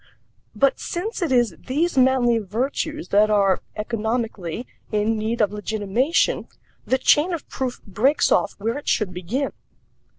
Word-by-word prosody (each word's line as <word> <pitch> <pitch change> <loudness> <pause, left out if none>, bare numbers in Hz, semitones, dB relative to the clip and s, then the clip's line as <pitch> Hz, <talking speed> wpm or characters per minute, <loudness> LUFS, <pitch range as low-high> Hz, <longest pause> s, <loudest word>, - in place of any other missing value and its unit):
But 270 +6 +2
since 395 +5 -4
it 335 -5 0
is 240 -8 +3
these 310 +6 0
manly 255 -3 +4
virtues 270 - -3
that 210 +1 +4
are 200 -3 +3
(economically) 220 -3 -3 0.3
in 215 +1 +1
need 220 +2 -1
of 205 -2 +2
legitimation, 215 - 0 0.4
the 260 - +3
chain 310 +6 +3
of 330 - -5
proof 255 -2 -3
breaks 255 +9 +2
off 205 - +2
where 230 +7 -2
it - - -16
should 200 -4 +1
begin. 205 +11 -2
230 Hz, 140 wpm, -23 LUFS, 210-270 Hz, 0.4 s, manly